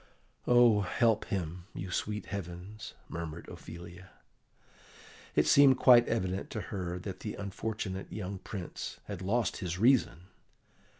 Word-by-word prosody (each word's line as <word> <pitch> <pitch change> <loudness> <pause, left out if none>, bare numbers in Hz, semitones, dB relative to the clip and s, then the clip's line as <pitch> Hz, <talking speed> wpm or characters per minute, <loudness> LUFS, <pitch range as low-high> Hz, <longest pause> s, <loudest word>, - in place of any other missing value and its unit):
"Oh, 120 -3 +6
help 110 +3 +2
him, 90 -2 -4
you 95 +1 -5
sweet 105 +3 -2
heavens!" 95 +2 -7
murmured 85 0 -6
Ophelia. 90 +2 -10 1.3
It - - +4
seemed 140 -2 +7
quite 120 -2 +7
evident 95 -4 -1
to 110 - -4
her 90 -2 -3
that 95 0 -6
the 105 - -5
unfortunate 100 -1 -4
young 95 -2 -5
Prince 95 -3 -6
had 100 -3 -7
lost 110 +5 0
his 90 -3 -3
reason. 115 -5 +3
100 Hz, 125 wpm, -31 LUFS, 90-110 Hz, 1.3 s, seemed